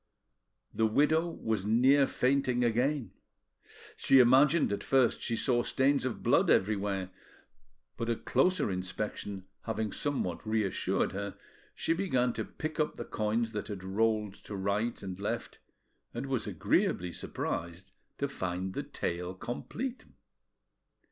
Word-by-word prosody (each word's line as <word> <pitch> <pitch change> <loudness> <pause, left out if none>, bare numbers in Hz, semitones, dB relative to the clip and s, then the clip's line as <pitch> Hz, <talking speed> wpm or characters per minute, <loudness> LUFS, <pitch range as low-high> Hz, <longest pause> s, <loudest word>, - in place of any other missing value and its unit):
The 110 +1 +2
widow 155 +8 +3
was 110 - -2
near 130 +6 +4
fainting 130 -1 +1
again: 120 0 +1 0.8
she 135 - +4
imagined 135 +4 +5
at 100 - -2
first 130 -3 +3
she 115 - -1
saw 120 +1 +2
stains 135 +2 +2
of 130 - -3
blood - - +4
everywhere, 100 -2 +1 0.9
but 115 - -2
a 115 - +2
closer 180 - +1
inspection 95 +1 -4 0.2
having 110 -2 -2
somewhat 130 - -2
reassured 110 -3 0
her, 100 0 -5 0.4
she 165 - +1
began 130 -10 +1
to 110 - -2
pick 155 0 -6
up 155 - +1
the 120 - -6
coins 110 +2 -1
that 105 -2 -4
had 100 -3 -6
rolled 105 +1 0
to 105 - -6
right 100 +5 -1
and 95 -1 -6
left, 115 +4 -4 0.6
and 120 +3 -3
was 130 -6 -2
agreeably 90 -1 +1
surprised 85 +2 -4 0.3
to 140 - 0
find 95 -7 -3
the - - -2
tale 90 +2 -4
complete. 235 - -5
115 Hz, 135 wpm, -31 LUFS, 100-135 Hz, 0.9 s, imagined